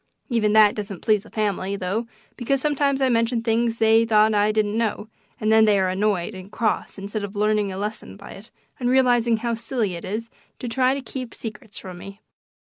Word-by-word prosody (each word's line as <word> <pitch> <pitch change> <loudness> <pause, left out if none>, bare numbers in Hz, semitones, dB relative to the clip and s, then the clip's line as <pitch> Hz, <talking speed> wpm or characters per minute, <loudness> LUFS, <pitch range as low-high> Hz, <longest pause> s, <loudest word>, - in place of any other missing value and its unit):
Even 215 -4 +1
that 215 -1 +6
doesn't 200 -3 -6
please 215 -3 +3
the 220 - -16
family, 200 -2 -2
though, 200 +5 -2 0.3
because 270 +3 0
sometimes 280 -1 0
I 265 - +3
mention 230 0 +1
things 230 0 +1
they 225 0 +4
thought 220 -1 +4
I 210 0 +3
didn't 215 -1 0
know, 225 -1 -2 0.3
and 215 0 +1
then 220 0 +6
they 210 -2 +4
are 190 -1 +1
annoyed 190 -1 0
and 185 +2 -10
cross 220 -2 -1
instead 200 +2 -5
of 200 +1 -6
learning 210 -1 +1
a 190 - -6
lesson 205 - -5
by - - -11
it 205 +4 -12 0.3
and 245 -1 0
realizing 245 -3 +3
how 235 +1 -2
silly 225 -3 -2
it 170 - -7
is 225 +4 -5 0.3
to 245 - -6
try 255 +3 +2
to 275 - -4
keep 255 -1 -7
secrets 215 -2 -8
from 180 -2 -8
me. 195 +2 -10
220 Hz, 210 wpm, -23 LUFS, 205-235 Hz, 0.3 s, that